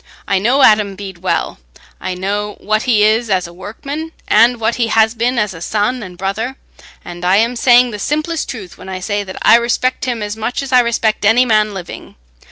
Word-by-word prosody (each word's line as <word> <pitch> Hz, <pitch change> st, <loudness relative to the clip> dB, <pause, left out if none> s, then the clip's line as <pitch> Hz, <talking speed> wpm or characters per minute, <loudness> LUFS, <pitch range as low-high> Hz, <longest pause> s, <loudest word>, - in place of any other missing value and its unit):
I 195 Hz, -, +1 dB
know 250 Hz, +7 st, +2 dB
Adam 210 Hz, -2 st, +4 dB
Bede 190 Hz, -3 st, -9 dB
well—I 170 Hz, -, -5 dB
know 205 Hz, +3 st, -3 dB
what 215 Hz, +1 st, -1 dB
he 215 Hz, -3 st, +4 dB
is 220 Hz, +2 st, +2 dB
as 185 Hz, -2 st, +1 dB
a 170 Hz, -, -10 dB
workman, 280 Hz, -, -7 dB
and 240 Hz, +1 st, +4 dB
what 225 Hz, +1 st, 0 dB
he 235 Hz, -2 st, +1 dB
has 220 Hz, 0 st, +3 dB
been 240 Hz, +2 st, -1 dB
as 210 Hz, -3 st, 0 dB
a 165 Hz, -, -11 dB
son 215 Hz, +7 st, -1 dB
and 180 Hz, -4 st, -9 dB
brother—and 195 Hz, -3 st, -7 dB
I 180 Hz, +2 st, +3 dB
am 230 Hz, +4 st, +2 dB
saying 245 Hz, 0 st, +4 dB
the 210 Hz, -, -6 dB
simplest 310 Hz, +6 st, -2 dB
truth 200 Hz, -8 st, -8 dB
when 190 Hz, -, -10 dB
I 185 Hz, -1 st, -5 dB
say 205 Hz, +2 st, -2 dB
that 190 Hz, -1 st, -9 dB
I -, -, +7 dB
respect 240 Hz, +2 st, -1 dB
him 240 Hz, -4 st, -2 dB
as 205 Hz, 0 st, -4 dB
much 225 Hz, +5 st, -3 dB
as 270 Hz, -, -7 dB
I 250 Hz, -, +7 dB
respect 230 Hz, -3 st, 0 dB
any 225 Hz, +5 st, +4 dB
man 215 Hz, -3 st, +1 dB
living. 180 Hz, -2 st, -9 dB
215 Hz, 205 wpm, -16 LUFS, 195-240 Hz, -, I